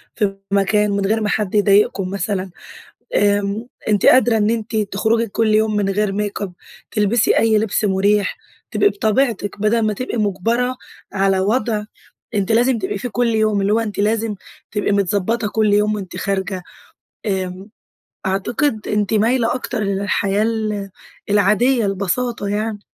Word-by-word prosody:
في 200 -3 0 0.2
مكان 205 +1 +2
من 200 0 0
غير 220 +3 +1
ما 210 - 0
حد 210 -1 -1
يضايقكم 200 -2 +3
مثلًا، 195 0 -2 0.7
آمم، 205 +2 +1 0.2
أنتِ 210 -2 +2
قادرة 240 -3 +5
إن 210 0 +2
أنتِ 230 0 -2
تخْرُجِي 220 +2 0
كل 215 +1 +1
يوم 215 0 +2
من 205 -1 +1
غير 205 +1 0
ميك 205 +1 -3
أب 195 -3 -4 0.4
تلبسي 215 +1 +2
أي 225 -1 +3
لبس 215 0 0
مريح، 200 +1 +1 0.3
تبقي 410 - +3
بِطَبِيعْتِك 220 - 0
بدل 215 +2 +2
ما 215 - +1
تبقي 255 +3 -4
مُجْبَرَة 230 +5 0 0.4
على 195 -1 +2
وضع 215 +1 0 0.5
أنتِ 200 +1 0
لازم 240 +2 +3
تبقي 195 -1 -3
فيه 245 +4 -4
كل 245 +2 0
يوم، 215 -2 +2
اللي 200 +2 +1
هو 225 - +3
أنتِ 215 -3 -4
لازم 215 0 0 0.4
تبقي 205 0 -1
متظبطة 205 +3 0
كل 215 0 +1
يوم 210 +1 +2
وأنتِ 190 -3 -7
خارجة 190 -1 -2 0.6
آمم، 190 0 -3 0.6
أعتقد 215 +5 -1
أنتِ 210 0 0
مايلة 230 +3 +2
أكتر 250 -2 -4
للحياة 200 +1 0
ال 215 -3 -2 0.4
العادية 210 +4 +3
البساطة 200 +3 -1
يَعْنِي. 210 +1 -2
210 Hz, 150 wpm, -19 LUFS, 200-225 Hz, 0.7 s, قادرة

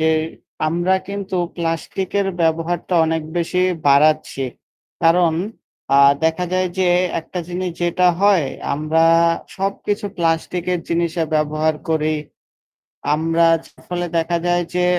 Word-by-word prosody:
যে 160 0 +3 0.6
আমরা 175 +3 +1
কিন্তু 200 -1 -4 0.2
প্লাস্টিকের 185 +4 -2
ব্যবহারটা 165 +2 0
অনেক 160 0 -1
বেশি 175 +2 0 0.2
বাড়াচ্ছি। 145 -1 +3 0.6
কারণ 165 0 +4 0.6
আ - - +6 0.3
দেখা 160 +3 +1
যায় 185 0 +1
যে 185 - +3 0.3
একটা 170 +3 -7
জিনিস 180 +1 -3
যেটা 180 +1 +3
হয় 195 -8 +4 0.3
আমরা 155 +2 +1 0.5
সবকিছু 205 +2 -2
প্লাস্টিকের 170 +2 0
জিনিসে 170 0 0
ব্যবহার 155 +1 +1
করি 155 -1 +1 1.0
আমরা। 165 +2 +2 0.4
ফলে 175 0 -2
দেখা 165 +1 0
যায় 175 0 +2
যে 180 0 +2
170 Hz, 110 wpm, -20 LUFS, 160-180 Hz, 1.0 s, আ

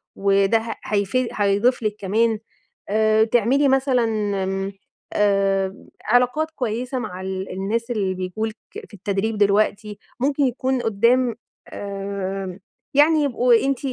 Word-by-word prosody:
وده 195 +2 +3
ه 225 0 -5
هيفيد 215 +4 0
هيضيف 205 +4 +2
لِك 210 -1 -1
كمان. 220 +3 +1 0.5
آآ، 220 +1 +3
تعملي 240 +5 +2
مثلًا 265 -2 +2 0.4
إمم، 195 +1 -2 0.4
آآ، 195 -1 +1 0.2
علاقات 250 +7 +2
كويسة 250 -1 -3
مع 185 -5 -6
ال 190 0 -4
الناس 220 +6 -2
اللي 200 -5 0
بييجوا 185 +4 -3
لِك 220 - -6 0.2
في - - -10
التدريب 205 +2 -2
دلوقتي، 205 +1 +1 0.2
ممكن 280 +2 +1
يكون 260 0 0
قدّام 235 +3 +2 0.3
آآ، 195 -1 -5 0.3
يعني 300 +2 +5
يبقوا 250 -2 +2
أنتِ 275 -2 0
215 Hz, 125 wpm, -22 LUFS, 195-245 Hz, 0.5 s, يعني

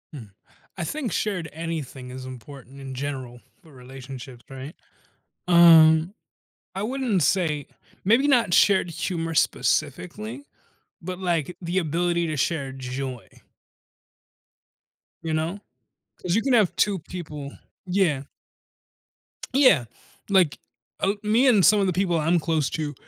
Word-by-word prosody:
Mm. 115 -7 -10 0.5
I 175 - -3
think 260 - -3
shared 180 -6 -2
anything 155 -6 -6
is 130 0 -8
important 130 +1 -11
in 135 -1 -7
general 130 -3 -5 0.2
for 160 -5 -19
relationships, 130 -1 -10
right? 135 +4 -9 0.7
Um, 165 0 +7 0.6
I 195 - -3
wouldn't 235 - 0
say 155 -5 0 0.4
maybe 235 +9 +4
not 235 -10 +3
shared 190 -2 +4
humor 165 0 -3
specifically, 180 - -1 0.6
but 180 +1 -6
like, 175 -2 -1
the 175 +2 0
ability 170 +1 0
to 155 - -3
share 140 -2 -1
joy. 130 -1 -6 2.0
You 160 -1 -3
know? 160 +6 -2 0.6
'Cause 180 0 -1
you 225 - +2
can 265 +2 0
have 215 -7 +3
2 200 -1 +2
people 150 -5 -8 0.3
Yeah. 180 -7 +1 1.3
Yeah. 255 - +5 0.4
Like, 185 -7 +3 0.4
uh 195 +1 +1
me 225 +5 +3
and 210 -8 +5
some 210 +4 +6
of 195 - +2
the 185 - 0
people 180 -1 +1
I'm 165 +3 +2
close 155 -3 0
to 150 -2 -3
165 Hz, 125 wpm, -24 LUFS, 140-190 Hz, 2.0 s, Um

